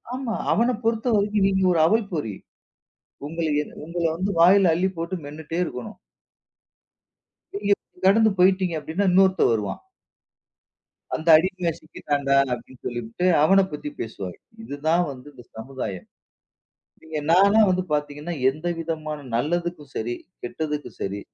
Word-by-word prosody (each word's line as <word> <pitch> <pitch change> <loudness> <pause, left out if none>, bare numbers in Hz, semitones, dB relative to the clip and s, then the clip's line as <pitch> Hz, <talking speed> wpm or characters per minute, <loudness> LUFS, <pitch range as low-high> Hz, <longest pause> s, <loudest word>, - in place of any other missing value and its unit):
ஆமா. 250 -4 -3 0.2
அவன 240 +3 +2
பொறுத்தவரைக்கும் 215 -3 +1
நீங்க 190 -1 +1
ஒரு 165 - +2
அவல் 220 +1 +2
பொறி. 110 - -3 0.9
உங்கள 165 +1 -3 0.2
என் - - -11
உங்கள 170 +1 -4
வந்து 190 +3 -2
வாயில 185 0 +6
அள்ளி 185 +3 +1
போட்டு 170 +3 -3
மென்னுட்டே 155 +3 -6
இருக்கணும். 125 -7 -7 1.6
நீங்க 200 0 +2 0.3
கடந்து 220 +3 +5
போய்ட்டீங்க 185 -2 +3
அப்படின்னா, 175 +6 -1
இன்னொருத்தன் 190 -7 +4
வருவான். 105 -2 -2 1.4
அந்த 160 +1 -6
அடிமை 180 0 -1
சிக்கிட்டான்டா 145 -3 -1 0.2
அப்படின்னு 125 +1 -9
சொல்லிட்டு 120 +8 -3 0.2
அவனைப் 190 +1 +4
பத்தி 150 0 -5
பேசுவாங்க. 95 -5 -6 0.3
இது 145 - -6
தான் 170 +2 +4
வந்து 130 +1 -12
இந்த 120 -2 -14
சமுதாயம். 110 -6 -6 1.0
நீங்க 160 -1 -5
நான்லாம் 200 +3 +5
வந்து 185 0 +1
பாத்தீங்கன்னா, 150 +3 -2 0.2
எந்த 155 +5 -8
விதமான 155 -2 -4 0.2
நல்லதுக்கும் 165 0 -2
சரி, 120 +2 -2 0.3
கெட்டதுக்கும் 150 +3 -4
சரி 100 +1 -3
165 Hz, 125 wpm, -24 LUFS, 145-190 Hz, 1.6 s, வாயில